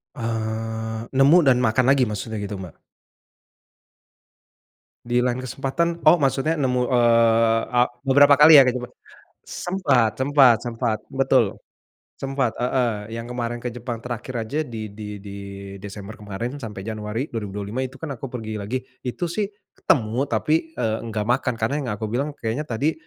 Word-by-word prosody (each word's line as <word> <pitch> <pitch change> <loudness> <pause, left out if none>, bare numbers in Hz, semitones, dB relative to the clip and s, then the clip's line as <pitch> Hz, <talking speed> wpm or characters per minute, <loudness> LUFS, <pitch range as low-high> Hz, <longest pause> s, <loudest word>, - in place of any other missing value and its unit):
Eee 110 -1 -3
nemu 140 +6 +5
dan 130 -3 +4
makan 125 +1 +2
lagi 135 -2 +4
maksudnya 105 +1 -4
gitu 100 0 -4
Mbak? 95 -4 -9 2.3
Di 120 +1 +1
lain 125 0 0
kesempatan, 140 +6 -2
oh 170 +3 +8
maksudnya 145 +3 +1
nemu 125 -3 +1
eee 115 -2 +4 0.2
e - - +6 0.3
beberapa 145 +2 +7
kali 150 +1 +10
ya 135 - +10
ke 125 - +3
Jepang? 125 -1 -6 0.5
Sempat, 145 - +1
sempat, 135 -3 +5
sempat, 115 -2 -2
betul, 135 -6 +2 0.6
sempat 135 -3 -1
heeh. 115 -4 -1
Yang 115 - -5
kemarin 120 -1 -3
ke 125 - -2
Jepang 120 -1 -6
terakhir 125 +1 -6
saja 140 +8 -3
di 110 -3 -6
di 105 0 -7
di 100 -1 -8 0.4
Desember 100 +1 -9
kemarin 110 +7 -5
sampai 105 -6 -7
Januari 110 +5 -4
2025 105 +1 -4
itu 130 - -9
kan 160 -3 -6
aku 135 0 -6
pergi 110 -4 -5
lagi, 125 +6 -3 0.2
itu 125 +8 -2
sih 210 +2 -1 0.3
ketemu 120 +3 +1
tapi 160 +3 0
e 125 - -1 0.2
enggak 110 -2 -3
makan 125 +2 +1
karena 115 +4 -1
yang 130 - -4
aku 110 - -4
bilang 140 +5 -2
kayanya 120 +6 -3
tadi, 125 +7 0
120 Hz, 155 wpm, -23 LUFS, 110-135 Hz, 2.3 s, kali